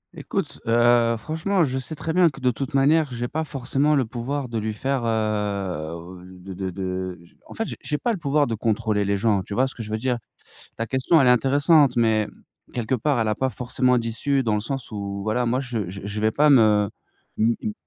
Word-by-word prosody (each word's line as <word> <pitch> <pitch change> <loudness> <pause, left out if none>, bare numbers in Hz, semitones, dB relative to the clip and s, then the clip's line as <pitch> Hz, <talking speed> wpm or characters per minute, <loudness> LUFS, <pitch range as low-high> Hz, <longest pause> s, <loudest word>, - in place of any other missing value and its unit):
Écoute, - - -4
heu, 120 0 +4
franchement 160 - 0
je 130 -3 -1
sais 145 +5 -6
très 160 +2 -3
bien 180 -1 +5
que, 140 - -12
de 125 -1 +2
toute 130 +4 -5
manière, 145 +2 +3
j'ai 120 0 -3
pas 160 +5 -2
forcément 145 0 0
le 135 -3 +2
pouvoir 125 +4 -4
de 115 -2 -3
lui 110 0 -3
faire, 135 +3 -2
heu, 95 -6 -2
de 95 +1 -10
de 95 +1 -4
de 95 -1 -4
je 85 - -21
En - - -11
fait, 225 - -2
je - - -5
j'ai 150 - -2
pas 240 - -1
le 200 - -4
pouvoir 145 -1 +2
de 115 - -3
contrôler 110 -1 0
les 100 0 +1
gens. 105 -1 +2
Tu 100 +2 -7
vois 130 - +3
ce 135 - -5
que - - -8
je 110 - -7
veux 110 - 0
dire? 125 +1 -1 0.6
Ta 115 - -2
question, 130 +8 +2
elle 135 - +4
est - - +7
intéressante, 140 +2 +4
mais, 110 -2 +2 0.5
quelque 120 0 -2
part, 130 +2 +1
elle 115 - +1
a 110 - +2
pas 130 +5 -1
forcément 125 0 +1
d'issue 120 +4 0
dans 110 -3 +1
le 105 - +1
sens 135 +3 -5
où 100 -1 -4
voilà, 115 +3 0
moi, 125 +2 +1
je 115 -8 -3
je 95 +2 -7
je 105 +1 -4
vais 110 0 +2
pas 150 -1 +6
me 105 -5 +5 0.5
m 115 +2 +3
m 215 - -2
120 Hz, 230 wpm, -23 LUFS, 105-135 Hz, 0.6 s, est